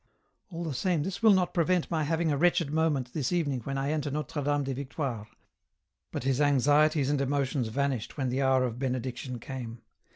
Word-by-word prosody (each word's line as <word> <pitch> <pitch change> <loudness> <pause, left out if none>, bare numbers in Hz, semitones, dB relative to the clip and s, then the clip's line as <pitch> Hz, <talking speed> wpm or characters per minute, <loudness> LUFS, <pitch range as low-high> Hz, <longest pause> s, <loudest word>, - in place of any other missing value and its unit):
" - - -44
AU 170 0 -5
the 160 -4 -3
same 170 +2 0
this 190 +5 -4
will 220 -1 +7
not 185 -2 +2
prevent 175 0 +1
my 160 -2 +1
having 160 +1 0
a - - +2
wretched 170 -3 +2
moment 150 -6 0
this 140 -5 -1
evening 150 -7 0
when 135 0 -3
I 135 +2 -1
enter 150 -2 -1
Notre 150 +1 -3
Dame 145 0 +1
des 135 0 -2
Victoires," 130 -5 -4 0.8
but - - -4
his 135 +1 +1
anxieties 145 +1 +3
and 145 -2 +1
emotions 140 -2 0
vanished 135 0 -2
when 130 -3 -1
the 130 +2 -1
hour 130 -1 +3
of 120 -1 -3
Benediction 130 -1 -3
came. 120 -2 -7
140 Hz, 200 wpm, -29 LUFS, 130-155 Hz, 0.8 s, will